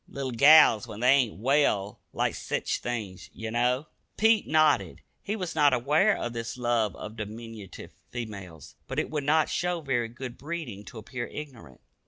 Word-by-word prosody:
Little 135 -2 -5
gals, 140 -3 +6
when 105 - -8
they 125 - +4
ain't 130 -5 +3
well, 110 -5 +1
like - - 0
sech - - -3
things, 110 -7 -4
ye 110 0 -6
know." 125 +4 +1 0.3
Pete 220 -1 +3
nodded. 155 0 +2 0.2
He 210 - -3
was 185 -5 -4
not 145 -2 +4
aware 150 - +3
of 120 - -4
this 115 +1 -5
love 120 -4 0
of 105 +1 -8
diminutive 110 -1 -8 0.2
females, 100 -9 -8
but - - -6
it - - -1
would 150 -2 -2
not 155 +2 +3
show 175 -1 -1
very 130 -6 -1
good 120 +1 -8
breeding 145 - -6
to 120 - -11
appear 120 +2 -6
ignorant. 120 - -10
120 Hz, 170 wpm, -27 LUFS, 110-150 Hz, 0.3 s, gals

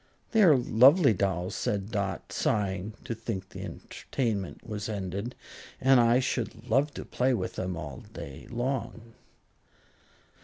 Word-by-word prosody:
"They 225 - +4
are 165 -8 +7
lovely 130 +4 +6
dolls," 90 -2 -1
said 100 +1 -2
Dot, 100 -4 -3
sighing 100 +1 -1
to - - -3
think 105 -4 -5
the - - -8
entertainment 110 -8 -4
was 105 0 -4
ended, 100 +3 -4 0.4
"and 135 -1 +5
I 120 +1 +5
should 120 -2 -3
love 135 +6 +2
to - - -6
play 125 +1 +1
with - - -3
them 90 -2 -3
all 75 -5 -6
day 70 -1 -9
long." 120 -2 -3
110 Hz, 140 wpm, -29 LUFS, 95-125 Hz, 0.4 s, are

